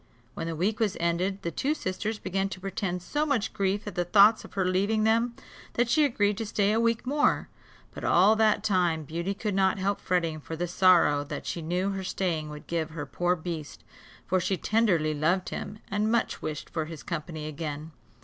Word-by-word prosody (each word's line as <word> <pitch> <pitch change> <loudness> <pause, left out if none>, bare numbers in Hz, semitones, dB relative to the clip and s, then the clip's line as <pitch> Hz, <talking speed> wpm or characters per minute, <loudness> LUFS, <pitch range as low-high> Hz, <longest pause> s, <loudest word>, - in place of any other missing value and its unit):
When 165 - -4
the 165 - -3
week 200 +7 0
was 215 -3 0
ended, 180 +4 0
the 170 - -2
two 285 - 0
sisters 210 0 -3
began 195 0 -2
to 190 - -7
pretend 185 -2 -3
so 295 +10 -1
much 280 -8 0
grief 200 0 0
at 205 - -5
the 175 - 0
thoughts 205 +5 +6
of - - -13
her 190 -2 +1
leaving 200 +4 +1
them, 230 +2 +2 0.4
that 240 0 +1
she 305 +5 +4
agreed 205 -7 +1
to 225 - -2
stay 205 -1 +1
a 220 - +2
week 230 0 +1
more; 290 +3 +1 0.4
but - - -8
all 195 +5 +5
that 215 -1 +3
time 180 -6 +1
Beauty 170 +6 -3
could 210 0 -2
not 190 0 +2
help 195 +1 -1
fretting 170 -4 0
for 160 +2 -7
the 175 +2 -2
sorrow 170 -6 +4
that - - -6
she 170 - -3
knew 180 +5 -1
her 195 -1 -4
staying 175 -4 -2
would 150 0 -9
give 165 -2 -2
her 155 -2 -5
poor 175 +1 0
beast; 160 -3 -6 0.4
for 185 +1 +1
she 185 +2 0
tenderly 180 -10 +2
loved 170 +5 +1
him, 210 - -6
and 210 +2 +1
much 235 -1 0
wished 155 -1 -5
for 160 -2 -2
his 160 -1 -9
company 155 -2 -5
again. 155 0 -5
185 Hz, 205 wpm, -28 LUFS, 165-210 Hz, 0.4 s, thoughts